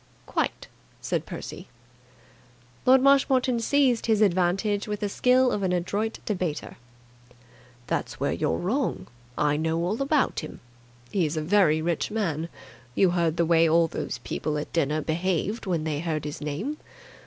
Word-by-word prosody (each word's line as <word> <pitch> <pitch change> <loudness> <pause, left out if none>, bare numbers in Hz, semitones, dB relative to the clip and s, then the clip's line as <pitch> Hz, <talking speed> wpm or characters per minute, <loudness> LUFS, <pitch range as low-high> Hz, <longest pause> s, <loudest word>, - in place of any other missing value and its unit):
"Quite!" - - -2 0.3
said - - -2
Percy. - - -7 1.2
Lord 260 0 +6
Marshmoreton 265 -3 +4
seized 255 0 +2
his 220 -1 +4
advantage 195 +3 +1
with 210 -1 -3
the 205 - 0
skill 250 +4 +3
of 205 - -1
an 190 -2 0
adroit 200 +5 -1
debater. 180 -7 -3 1.1
"That's - - -3
where - - 0
you're 80 - 0
wrong. 245 +9 -1 0.3
I 150 0 +2
know 160 +1 0
all 210 +8 -1
about 275 0 +1
him. 155 - -8 0.5
He's 165 -5 0
a 155 - -1
very 160 -3 +3
rich 170 -1 -1
man. 170 -7 -2 0.5
You 190 -3 +4
heard 170 -2 +1
the 170 - +3
way 165 0 +4
all 165 +1 +4
those - - -4
people 150 -1 -2
at 150 - -5
dinner 155 -1 +1
behaved 185 +7 -1
when 170 -4 0
they 155 -2 -2
heard 155 -2 -2
his 150 +1 -6
name. 160 - -3
180 Hz, 155 wpm, -26 LUFS, 160-220 Hz, 1.2 s, Lord